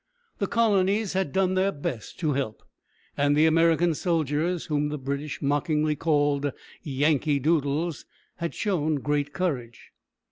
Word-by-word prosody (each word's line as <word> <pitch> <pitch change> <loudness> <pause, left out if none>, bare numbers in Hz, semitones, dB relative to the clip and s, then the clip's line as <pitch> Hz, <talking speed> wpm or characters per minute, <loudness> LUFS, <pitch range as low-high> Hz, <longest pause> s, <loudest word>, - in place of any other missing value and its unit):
The 200 - 0
colonies 205 -2 +2
had 190 -6 -1
done 190 +2 +1
their 190 +1 +2
best 135 - -5
to 155 -3 +1
help, 130 -6 -3 0.5
and 145 +1 +2
the 155 - +5
American 165 +1 +3
soldiers, 165 +1 0
whom 150 -1 0
the 150 - -3
British 140 +2 -4
mockingly 150 +2 +1
called 145 -2 +1 0.3
"Yankee 145 0 +1
Doodles," 150 +2 0 0.3
had 170 -1 -4
shown 160 -7 0
great 145 0 -1
courage. 130 -11 -3
150 Hz, 135 wpm, -26 LUFS, 145-175 Hz, 0.5 s, the